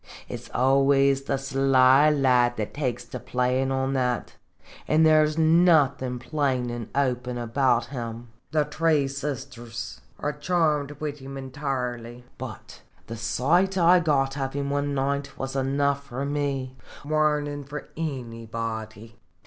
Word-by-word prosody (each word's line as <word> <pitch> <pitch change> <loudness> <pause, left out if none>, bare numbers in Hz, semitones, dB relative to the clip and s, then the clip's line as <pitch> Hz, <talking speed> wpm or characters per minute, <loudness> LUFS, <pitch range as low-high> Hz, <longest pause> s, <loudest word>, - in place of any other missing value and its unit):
It - - -5
's - - -15
always 135 +1 +3
the 135 - 0
sly 135 +1 +4
lad 125 -4 +3
that 105 -2 -3
takes 130 -4 -2
to 120 - -7
playin' 125 +1 0
on 135 0 0
that, 125 -2 -1 0.5
an* 155 +1 +4
there 155 -1 +6
's 155 +1 -4
nothin' 155 -6 +3
plain 130 -1 -1
an' 120 -2 -6
open 125 -3 0
about 120 +1 +1
him. 120 -3 -6 0.2
The 155 -1 +1
three 150 -1 +1
sisters 135 -4 -6 0.2
are 150 - -2
charmed 150 -2 0
wid 150 -1 -4
him 135 +1 -8
in 135 -1 -7
toirly. 125 -4 -4 0.2
But - - -9 0.2
the 115 - -7
sight 155 - +1
I 180 +1 +6
got 140 -4 +1
of 135 0 -2
him 140 0 -2
one 145 0 -1
night 140 +1 -2
was 135 0 -4
enough 140 +1 0
for 135 +1 -4
me 140 -3 -2 0.3
warnin' 150 -1 0
for 145 +2 -8
anybody. 115 -5 -5
135 Hz, 140 wpm, -25 LUFS, 125-145 Hz, 0.5 s, there